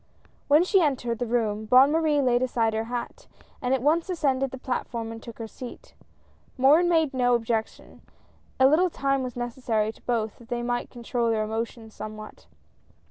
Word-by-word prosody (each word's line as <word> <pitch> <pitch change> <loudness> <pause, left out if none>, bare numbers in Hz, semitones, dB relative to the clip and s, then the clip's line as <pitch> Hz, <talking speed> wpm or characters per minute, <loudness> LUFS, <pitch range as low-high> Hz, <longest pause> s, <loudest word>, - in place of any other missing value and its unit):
When 300 +4 +5
she 380 +1 +3
entered 250 -7 0
the 245 - -2
room, 220 -2 -1
Bonne 255 +5 +6
Marie 310 -3 +2
laid 245 -1 +2
aside 230 -3 +1
her 220 +1 -1
hat, 240 +1 -6 0.3
and 250 - -1
at 265 -2 +1
once 325 +5 +2
ascended 270 -6 0
the 260 - -8
platform 240 -3 -4
and 225 0 -8
took 235 -1 -10
her 230 - -5
seat. 255 - -10 0.6
Morin 300 +7 +5
made 320 -5 +2
no 245 -1 +3
objection, 225 -1 -3 0.6
a 260 - +6
little 320 +7 +4
time 275 -3 0
was 255 -2 -5
necessary 240 -3 -1
to - - -22
both 225 -3 -2
that 235 - -16
they 240 0 -2
might 240 0 -2
control 235 -1 -2
their 220 -1 +1
emotions 225 +1 -5
some 215 0 -7
what. 215 0 -12
245 Hz, 185 wpm, -26 LUFS, 225-275 Hz, 0.6 s, Bonne